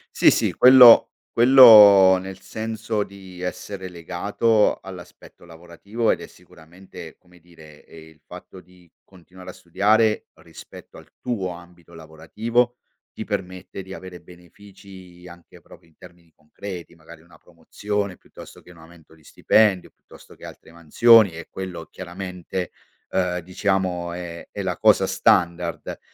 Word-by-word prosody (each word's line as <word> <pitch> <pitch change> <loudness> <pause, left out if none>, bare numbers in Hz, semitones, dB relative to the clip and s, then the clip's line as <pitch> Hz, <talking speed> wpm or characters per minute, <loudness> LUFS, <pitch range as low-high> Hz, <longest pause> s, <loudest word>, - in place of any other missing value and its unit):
Sì, - - +4
sì - - -1
quello 125 -2 +7 0.3
quello, 105 -7 +7
nel 95 +1 -10
senso 110 +1 -5
di 95 -2 -15
essere 95 +1 -7
legato 100 +6 -1
all'aspetto 90 -2 -14
lavorativo, 85 +7 -5
ed - - -1
è - - -10
sicuramente 90 0 -16
come 90 -1 -24
dire, 80 -3 -19
ehm, 80 -1 -16
il 80 -1 -23
fatto 90 +1 -13
di 90 -2 -24
continuare 90 0 -15
a - - -11
studiare 105 +5 0
rispetto - - -15
al - - -16
tuo 105 -7 -4
ambito 85 -1 -15
lavorativo 110 +11 -3 0.3
ti - - -9
permette 95 +1 -7
di 95 0 -11
avere 90 -1 -12
benefici, 90 0 -17
anche 85 0 -17
proprio 85 - -20
in 80 - -32
termini 85 -2 -19
concreti, 85 +2 -11
magari 80 0 -17
una 85 - -22
promozione 100 -2 -6
piuttosto - - -16
che 90 - -18
un 85 - -20
aumento 80 -1 -19
di 80 - -25
stipendio, 100 +3 0
piuttosto - - -20
che - - -17
altre - - -14
mansioni 105 +6 +4
e 85 - -10
quello 90 -3 -8
chiaramente, 90 0 -8 0.4
uhm, 90 -1 -2
diciamo 90 -1 -3
è 85 -1 -9
è - - -7
la - - -4
cosa - - +2
standard. 85 0 -1
90 Hz, 140 wpm, -21 LUFS, 85-100 Hz, 0.4 s, quello